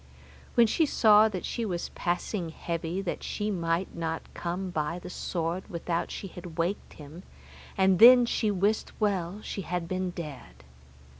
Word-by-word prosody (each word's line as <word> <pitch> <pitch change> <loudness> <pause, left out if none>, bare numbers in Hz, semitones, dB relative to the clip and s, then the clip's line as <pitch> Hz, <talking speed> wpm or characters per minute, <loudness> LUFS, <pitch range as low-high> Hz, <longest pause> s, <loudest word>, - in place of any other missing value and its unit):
When 235 - +7
she 310 +8 +2
saw 215 -4 +6
that 185 -4 -5
she 235 - -3
was 180 -5 -3
passing 175 0 -2
heavy 170 +3 -3
that 180 - -3
she 210 0 -2
might 170 0 -1
not 165 -1 -4
come 180 +2 -4
by 155 0 -2
the 180 - -8
sword 170 +1 -3
without 170 0 -2
she - - -6
had 180 0 -9
awaked 170 +4 -3
him, 150 +3 -11 0.6
and 190 -1 +4
then 245 +2 +9
she 225 -2 0
wist 205 +2 0
well 200 -2 -1
she 195 - -4
had 175 -2 -3
been 185 +1 -2
dead. 140 - -9
180 Hz, 160 wpm, -28 LUFS, 170-205 Hz, 0.6 s, then